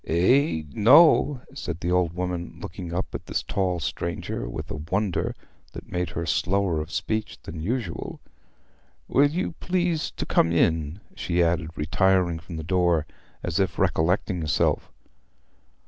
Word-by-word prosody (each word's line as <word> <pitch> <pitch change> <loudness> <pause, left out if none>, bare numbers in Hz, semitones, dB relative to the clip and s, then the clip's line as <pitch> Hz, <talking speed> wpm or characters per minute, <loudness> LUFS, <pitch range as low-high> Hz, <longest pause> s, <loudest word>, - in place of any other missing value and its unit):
"Eh?... 90 - +3
no," 145 +3 +6
said 85 - -5
the 90 0 -2
old 90 -2 +2
woman, 90 -1 -3
looking 85 +1 -7
up 90 +2 -3
at - - -6
this - - -1
tall 95 -4 -1
stranger 75 -4 -3
with - - -6
a 75 - -4
wonder 95 -1 0 0.4
that - - -10
made 90 0 -1
her 85 - -4
slower 90 -2 +1
of 80 +2 -7
speech 110 -1 -2
than 80 0 -7
usual. 105 -2 -3 0.9
"Will 145 +1 +4
you 175 +5 -2
please 175 -3 0
to - - -5
come 85 - +3
in?" 80 0 +1 0.2
she 85 0 +1
added, 85 -1 0
retiring 90 +2 +2
from 80 +2 -9
the 80 - -4
door, 85 -2 +2 0.4
as - - -1
if - - 0
recollecting 90 +2 +1
herself. 75 -2 0
90 Hz, 145 wpm, -25 LUFS, 80-105 Hz, 0.9 s, no